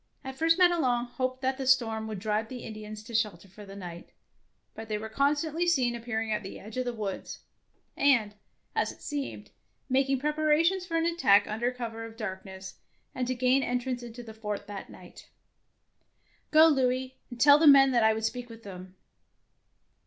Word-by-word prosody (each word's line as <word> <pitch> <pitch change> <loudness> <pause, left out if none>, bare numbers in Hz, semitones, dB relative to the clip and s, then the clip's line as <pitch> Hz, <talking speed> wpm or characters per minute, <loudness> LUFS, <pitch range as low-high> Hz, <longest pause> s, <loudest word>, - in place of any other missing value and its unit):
At 265 -1 -6
first 330 +3 +3
Madelon 315 -10 +3
hoped 255 +1 -4
that 260 +1 0
the 265 - -3
storm 225 -4 +2
would 215 -2 -5
drive 215 +2 -2
the 250 -2 -7
Indians 215 -1 -8
to 230 +2 -11
shelter 210 -5 -1
for 205 +2 -13
the 195 - -10
night, 175 -3 -9 0.6
but 220 0 -9
they 210 - -1
were 220 +1 -6
constantly 295 +7 0
seen 260 -8 +2
appearing 225 -2 -3
at 210 0 0
the 195 - -8
edge 215 +1 -11
of 255 - -1
the 245 - -1
woods, 210 -4 -5 0.5
and, 240 -7 +3 0.4
as - - 0
it - - -16
seemed, 290 -2 -5 0.4
making 270 +1 +2
prep 300 +3 -2
arations 330 +5 +2
for 330 -2 -1
an 330 - +1
attack 210 - +4
under 230 +4 -1
cover 230 -2 -6
of 225 0 -8
the - - -23
darkness, 190 -3 -7 0.3
and 250 -1 -2
to 255 - -1
gain 255 +2 +3
entrance 250 0 -2
into 240 0 -9
the 220 -1 -10
fort 210 -2 -5
that 200 -1 -8
night. - - -14 0.6
" - - -41
Gro, 315 +1 +7
Louis, 260 -2 0
and 245 -2 -10
tell 285 +3 +8
all - - -3
the 320 - +5
men 270 -1 +8
that 240 -3 +3
I 220 0 +4
would 220 0 -2
speak 245 +1 -4
with 230 0 -12
them. 185 -1 -10
245 Hz, 195 wpm, -28 LUFS, 215-270 Hz, 0.6 s, tell